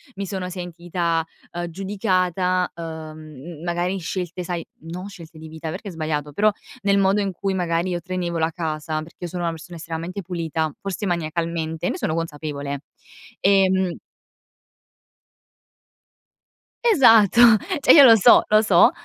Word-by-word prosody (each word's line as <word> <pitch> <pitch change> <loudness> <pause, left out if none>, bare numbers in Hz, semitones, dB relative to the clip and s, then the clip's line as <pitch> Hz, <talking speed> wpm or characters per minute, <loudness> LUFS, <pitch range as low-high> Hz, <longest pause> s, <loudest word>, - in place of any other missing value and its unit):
mi 200 0 -4
sono 190 -1 -4
sentita, 175 -2 -2 0.3
uhm, 175 0 -3
giudicata, 185 -1 0
uhm, 155 -1 -9
magari 175 +2 -1
scelte 180 0 -4
sai, 175 -1 -4 0.2
non 175 +4 -7
scelte 170 -5 -12
di 160 0 -10
vita 160 0 -7
perché 185 +6 -7
è - - -5
sbagliato, 155 -3 -3
però 210 +7 +3 0.3
nel 200 -1 +2
modo 195 +1 +3
in 200 -1 -1
cui 195 +2 -3
magari 175 -1 -1
io 175 -1 -2
tenevo 175 -1 -3
la 160 +1 +1
casa, 155 -2 -3
perché 160 +2 -13
io - - -2
sono 175 0 -4
una 170 - 0
persona 170 +2 -10
estremamente 165 +4 -5
pulita, 165 -3 -2
forse 195 +1 -4
maniacalmente, 165 -1 -2
ne - - -3
sono 155 - -2
consapevole. 145 -3 -4 0.6
E, 195 -1 +4
mhmm 190 -2 0 2.9
Esatto, 235 - +6 0.4
cioè - - +6
io 290 - +9
lo 235 -4 +9
so, 200 - +7
lo 215 0 +5
so. 210 0 +5
175 Hz, 150 wpm, -22 LUFS, 160-190 Hz, 2.9 s, io